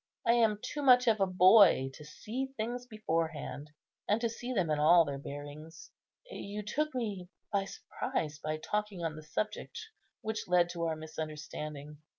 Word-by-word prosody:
I 230 - +5
am 225 -3 +3
too 295 - -4
much 250 -2 +6
of 220 -2 +4
a 195 - +3
boy 185 -7 +6
to 150 - -11
see 220 - -5
things 240 +3 -3
beforehand, 165 - -3 0.4
and 210 +2 +3
to 235 - +1
see 240 +2 -6
them 185 -10 +1
in 150 - +1
all 165 +2 +6
their 140 -1 -4
bearings. 145 - -9 0.3
You 210 - -6
took 300 +8 -2
me 205 -7 -3 0.2
by 200 -1 +2
surprise 155 -5 -4
by 155 +1 -2
talking 210 +1 -3
on 160 -2 -2
the 155 - -8
subject 215 - -4 0.4
which 220 0 -3
led 175 -1 +4
to 170 -1 -3
our 160 -1 0
misunderstanding. 150 -1 -7
180 Hz, 165 wpm, -32 LUFS, 155-220 Hz, 0.4 s, much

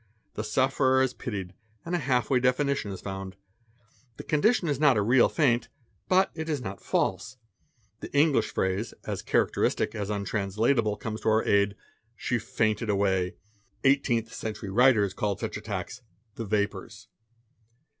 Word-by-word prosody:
The 110 - -4
sufferer 130 +3 +2
is 130 -1 -1
pitied 95 -6 -5 0.3
and 170 - -4
a 175 - +2
half 130 -2 0
way 130 - +4
definition 125 -1 +1
is 95 - -7
found: 95 -1 -6 0.8
the - - -7
condition 180 +5 +2
is 145 -3 -1
not 145 -6 +5
a - - +3
real 120 +4 +4
faint, 125 -7 +1 0.4
but 190 +1 +4
it 160 0 -5
is 150 -2 0
not 100 -5 -7
false. - - -1 0.6
The - - -8
English 145 0 +3
phrase, 95 +4 -1
as - - -3
characteristic - - +1
as 100 -1 -4
untranslat 105 +2 0
able, 105 -2 0
comes 110 -1 -5
to - - +1
our 110 +1 +2
aid, 100 0 +2 0.4
"she 120 +2 -1
fainted 110 0 -1
away.' 95 -3 +1 0.5
Eighteenth 120 -4 +2
century 110 -2 -5
writers 110 -3 +4
called 100 -1 -2
such 110 - -4
attacks 105 +2 -5 0.3
"the 115 - -6
vapours." 105 0 -3
110 Hz, 155 wpm, -27 LUFS, 100-130 Hz, 0.8 s, not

